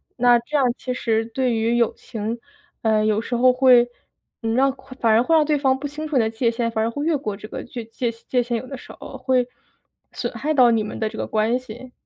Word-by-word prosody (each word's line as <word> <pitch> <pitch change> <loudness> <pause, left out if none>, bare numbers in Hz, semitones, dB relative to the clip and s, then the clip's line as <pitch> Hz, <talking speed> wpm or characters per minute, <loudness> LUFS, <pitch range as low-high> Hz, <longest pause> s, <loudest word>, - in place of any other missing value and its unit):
那 245 -1 +5
这 260 +6 -7
样 280 -3 +4
其 255 - -4
实 225 -3 0
对 245 +2 -1
于 225 +1 +1
友 235 -2 +2
情， 225 0 -5 0.4
呃， 215 -1 +2
有 215 -1 +2
时 240 - -3
候 255 +2 +5
会， 250 -1 +6 0.6
呃， 225 - -2
让 270 +3 +3 0.3
反 230 - +4
而 220 +1 +5
会 325 +7 +2
让 315 - +5
对 300 0 +1
方 265 -2 +2
不 275 - -7
清 300 +2 -5
楚 305 - -4
你 255 - +5
的 220 - 0
界 230 +2 0
限， 230 0 -1
反 220 -1 -1
而 225 - +1
会 285 +5 -4
越 320 -2 +2
过 215 -7 -4
这 210 - -11
个 - - -5
具 240 -1 -7
界 235 +2 -3
界 230 +2 -1
限 240 -1 -2
有 230 - -6
的 270 - -7
时 - - -12
候， 270 - -9
会 255 -1 +1 0.6
损 - - -3
害 310 +1 -1
到 250 -5 +6
你 225 -1 +2
们 210 - -5
的 220 - -1
这 220 - -10
个 - - -3
关 220 +3 +1
系。 255 +1 -11
240 Hz, 275 characters per minute, -22 LUFS, 225-260 Hz, 0.6 s, 会